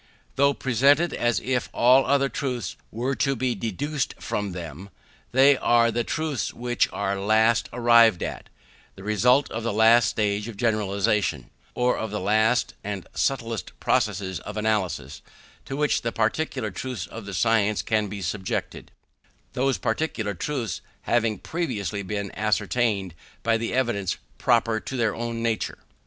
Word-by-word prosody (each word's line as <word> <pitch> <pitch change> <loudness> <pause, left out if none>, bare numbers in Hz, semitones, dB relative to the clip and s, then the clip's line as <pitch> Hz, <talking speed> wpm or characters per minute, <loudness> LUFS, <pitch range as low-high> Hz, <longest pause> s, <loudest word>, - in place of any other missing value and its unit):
Though 140 +1 +3
presented 140 +7 +3
as 120 -1 +1
if 125 -1 -1
all 130 +3 +5
other 140 0 +3
truths 130 -4 -3 0.2
were 125 +4 -1
to 135 -1 +1
be 125 0 0
deduced 120 - -3
from 105 -2 -3
them, 85 +1 -8 0.4
they 135 +3 +6
are 120 -1 +3
the 120 +1 0
truths 155 -2 -2
which 120 0 0
are 100 -1 -2
last 110 +3 +3
arrived 115 -4 +5
at; - - -6 0.5
the 95 - -12
result 125 +7 +3
of 115 - -3
the 115 - -1
last 110 +2 +5
stage 105 0 -1
of 115 -4 -8
generalization, 100 - 0 0.2
or 125 0 +1
of 110 - -3
the 105 - -3
last 110 +5 +2
and 100 -3 -4
subtlest 115 -5 -2
process 95 -4 0
of - - -8
analysis, 105 -4 -1 0.4
to 135 - -5
which 150 0 +1
the 115 - -2
particular 115 0 -1
truths 125 +6 -5
of 110 -2 -9
the 100 - -6
science 105 +1 +2
can 110 -1 0
be 100 -1 -6
subjected; 95 +3 -3 0.6
those 135 +1 +1
particular 110 -10 -2
truths 115 - -3 0.2
having 115 -2 +1
previously 110 - -3
been 100 0 -4
ascertained 110 -2 0 0.3
by 115 0 +3
the 115 0 -2
evidence 115 -8 0 0.2
proper 115 -2 +2
to 130 - -6
their 115 -3 +1
own 115 0 -4
nature. 115 -2 -1
115 Hz, 150 wpm, -25 LUFS, 105-125 Hz, 0.6 s, they